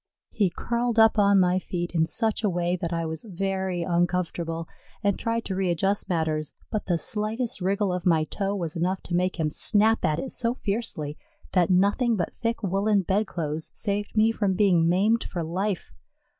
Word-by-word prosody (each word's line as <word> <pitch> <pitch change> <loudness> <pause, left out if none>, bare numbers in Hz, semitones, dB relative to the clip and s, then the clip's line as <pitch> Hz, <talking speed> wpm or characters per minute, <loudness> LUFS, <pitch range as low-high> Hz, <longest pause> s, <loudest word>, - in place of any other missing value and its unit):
He 200 -4 +2
curled 235 +5 -2
up 220 -1 +6
on 200 -1 +5
my 180 0 +3
feet 175 -1 -4
in 160 -1 +2
such 225 +1 -1
a 210 - +3
way 175 0 0
that 170 -1 -4
I 165 -1 -1
was 160 0 -4
very 190 -1 -2
uncomfortable 170 -2 -1 0.4
and 200 -1 +2
tried 230 0 -2
to 195 - -3
readjust 195 +2 0
matters, 155 -3 -1 0.2
but 215 -3 -3
the 175 -3 +2
slightest 215 +4 -1
wriggle 195 +1 +1
of 180 -1 -3
my 160 -3 +4
toe 195 +5 -2
was 170 -4 -3
enough 180 +3 -1
to 175 - -3
make 180 0 0
him 155 -1 0
snap 220 +6 +2
at 155 -1 +2
it 265 - -4
so 235 0 0
fiercely 195 - -3 0.3
that 180 -3 +3
nothing 205 +6 +3
but 175 - -2
thick 230 -1 -3
woollen 200 +1 +2
bedclothes 170 -6 -2
saved 205 0 -2
me 220 +1 +5
from 200 -4 0
being 180 -5 +4
maimed 210 +6 +3
for 175 -3 -4
life. 185 +4 -3
190 Hz, 185 wpm, -26 LUFS, 170-210 Hz, 0.4 s, up